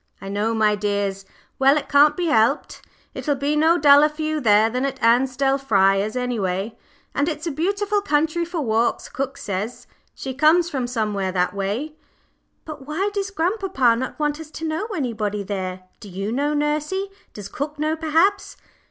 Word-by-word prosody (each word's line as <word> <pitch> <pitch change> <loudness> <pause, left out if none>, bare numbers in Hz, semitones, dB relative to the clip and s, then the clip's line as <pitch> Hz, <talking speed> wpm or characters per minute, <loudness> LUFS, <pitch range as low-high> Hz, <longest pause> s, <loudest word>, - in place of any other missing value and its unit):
"I 195 - -8
know, 210 +3 -1
my 215 -1 +3
dears. 200 -1 -2 0.3
Well, 270 +2 +5
it 300 - -3
can't 295 +1 +5
be 355 - -1
helped. 275 -1 +1 0.3
It'll 290 -2 -1
be 285 +2 -1
no 320 +3 +4
duller 290 0 +6
for 305 +1 -6
you 310 0 -1
there 215 -2 +5
than 250 +3 -2
at 270 -1 -3
Ansdell 260 +3 +2
Friars, 200 -4 +2
any 250 -2 -2
way, 190 +3 -2 0.4
and 285 +3 +1
it's 305 0 -5
a 335 - -1
beautiful 400 +7 0
country 320 -1 +1
for 340 -1 -4
walks, 230 -2 0
cook 270 +1 -4
says. 205 +4 -5 0.3
She 265 - -5
comes 320 +5 +3
from 260 -5 -2
somewhere 210 -5 -2
that 180 0 0
way." 215 +11 -3 0.7
"But 300 -4 -9
why 375 +7 -1
does 395 -1 -2
grandpapa 360 - +1
not 260 +3 -4
want 295 0 -1
us 320 -1 -9
to 320 +1 -5
know 320 +7 -2
anybody 225 - -3
there 185 -2 -4 0.2
do 205 - -11
you 195 +3 -4
know, 290 +4 0
nursey? 300 +7 -1 0.2
Does 205 -2 -8
cook 295 +7 -5
know, 310 +1 0
perhaps?" 325 +6 +1
275 Hz, 180 wpm, -22 LUFS, 215-310 Hz, 0.7 s, duller